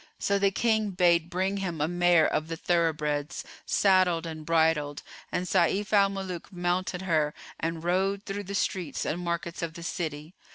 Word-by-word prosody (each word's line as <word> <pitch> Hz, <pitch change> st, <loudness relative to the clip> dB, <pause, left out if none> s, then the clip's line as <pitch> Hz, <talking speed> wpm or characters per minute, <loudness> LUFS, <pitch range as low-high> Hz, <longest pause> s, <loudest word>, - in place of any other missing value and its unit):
So 200 Hz, 0 st, +1 dB
the 200 Hz, 0 st, +4 dB
King 220 Hz, +1 st, +1 dB
bade 175 Hz, -3 st, +3 dB
bring 190 Hz, +3 st, -1 dB
him 180 Hz, -5 st, -3 dB
a 150 Hz, -, +1 dB
mare 175 Hz, -2 st, +4 dB
of 155 Hz, -, 0 dB
the 165 Hz, 0 st, -4 dB
thoroughbreds, 155 Hz, -4 st, 0 dB, 0.2 s
saddled 185 Hz, -4 st, +3 dB
and 160 Hz, -1 st, -6 dB
bridled; 160 Hz, -3 st, +1 dB, 0.3 s
and 180 Hz, -, -1 dB
Sayf 190 Hz, +3 st, +1 dB
al 200 Hz, -1 st, +5 dB
Muluk 190 Hz, -3 st, -6 dB
mounted 180 Hz, +1 st, -1 dB
her 155 Hz, -5 st, +1 dB, 0.2 s
and 165 Hz, 0 st, -3 dB
rode 190 Hz, +3 st, +1 dB
through 205 Hz, 0 st, -5 dB
the 200 Hz, +2 st, -5 dB
streets 185 Hz, -4 st, -1 dB
and 170 Hz, -, -2 dB
markets 170 Hz, 0 st, -3 dB
of 165 Hz, -1 st, -4 dB
the 170 Hz, -, -8 dB
city. 160 Hz, -2 st, -4 dB
175 Hz, 170 wpm, -28 LUFS, 160-190 Hz, 0.3 s, al